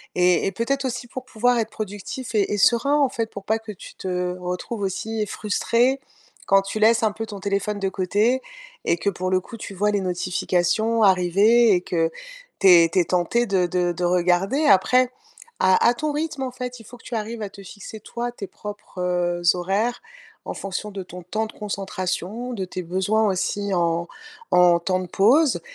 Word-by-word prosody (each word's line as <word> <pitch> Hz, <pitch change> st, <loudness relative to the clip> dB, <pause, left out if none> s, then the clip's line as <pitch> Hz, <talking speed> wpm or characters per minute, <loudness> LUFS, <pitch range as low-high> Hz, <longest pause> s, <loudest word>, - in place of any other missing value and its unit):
et 180 Hz, 0 st, +3 dB
et -, -, 0 dB
peut-être 265 Hz, +7 st, -1 dB
aussi 250 Hz, -1 st, -3 dB
pour 255 Hz, +1 st, -7 dB
pouvoir 245 Hz, 0 st, +1 dB
être 220 Hz, -, -1 dB
productif 215 Hz, +4 st, -6 dB
et 205 Hz, -2 st, +1 dB
et 205 Hz, -, 0 dB
serein, 235 Hz, +7 st, +3 dB
en 280 Hz, -3 st, +3 dB
fait, 230 Hz, -4 st, -3 dB
pour 200 Hz, -, -9 dB
pas 220 Hz, +1 st, +1 dB
que 220 Hz, -1 st, -8 dB
tu 195 Hz, -, -12 dB
te 180 Hz, -1 st, -2 dB
retrouves 180 Hz, +5 st, -4 dB
aussi 210 Hz, +3 st, -2 dB
frustré 235 Hz, +6 st, +1 dB, 0.5 s
quand 195 Hz, 0 st, +5 dB
tu 200 Hz, +2 st, -4 dB
laisses 225 Hz, +2 st, +4 dB
un 215 Hz, -, +3 dB
peu 225 Hz, +1 st, -5 dB
ton 205 Hz, -2 st, -7 dB
téléphone 200 Hz, +1 st, -1 dB
de 195 Hz, -1 st, 0 dB
côté 205 Hz, +7 st, +1 dB, 0.4 s
et 170 Hz, -, +2 dB
que, 200 Hz, -, 0 dB
pour 185 Hz, +1 st, -3 dB
le 185 Hz, -, +3 dB
coup, 230 Hz, +5 st, -11 dB
tu 205 Hz, -, -8 dB
vois 210 Hz, +3 st, +1 dB
les 205 Hz, -1 st, 0 dB
notifications 185 Hz, +4 st, 0 dB
arriver 200 Hz, +4 st, +5 dB
et 180 Hz, -, +2 dB
que 165 Hz, -2 st, 0 dB, 0.5 s
tu 195 Hz, -, +4 dB
es 170 Hz, -2 st, +8 dB
tu 170 Hz, -, -3 dB
es 175 Hz, -, +3 dB
tenté 180 Hz, +8 st, +1 dB
de 190 Hz, -4 st, +1 dB
de 175 Hz, 0 st, 0 dB
de 175 Hz, +1 st, -4 dB
regarder. 180 Hz, -, +2 dB
Après 250 Hz, +5 st, +4 dB, 0.5 s
à 185 Hz, 0 st, +4 dB
à 240 Hz, -, +5 dB
ton 300 Hz, +5 st, -2 dB
rythme, 300 Hz, -1 st, -3 dB
en 255 Hz, -, -3 dB
fait, 250 Hz, 0 st, -6 dB
il 225 Hz, -, -14 dB
faut 245 Hz, -, -12 dB
que -, -, -21 dB
tu -, -, -9 dB
arrives 220 Hz, +1 st, -4 dB
à 200 Hz, -, -4 dB
te 200 Hz, -, -12 dB
fixer, 205 Hz, +3 st, -10 dB
toi, 240 Hz, +3 st, -5 dB
tes 205 Hz, -5 st, -7 dB
propres, 205 Hz, -2 st, -10 dB
heu, 175 Hz, -1 st, 0 dB
horaires, 195 Hz, +7 st, -1 dB, 0.4 s
en -, -, -5 dB
fonction 195 Hz, +2 st, -5 dB
de 195 Hz, -1 st, -6 dB
ton 180 Hz, 0 st, -10 dB
temps 215 Hz, +5 st, -2 dB
de -, -, -11 dB
concentration, 200 Hz, +3 st, -4 dB
de 195 Hz, -5 st, -3 dB
tes 185 Hz, 0 st, -5 dB
besoins, 190 Hz, +5 st, +1 dB
aussi, 200 Hz, +1 st, -1 dB
en 170 Hz, 0 st, 0 dB, 0.4 s
en 175 Hz, -1 st, +5 dB
temps 185 Hz, +2 st, 0 dB
de 185 Hz, -, -6 dB
pause 250 Hz, -, +3 dB
200 Hz, 205 wpm, -23 LUFS, 180-230 Hz, 0.5 s, es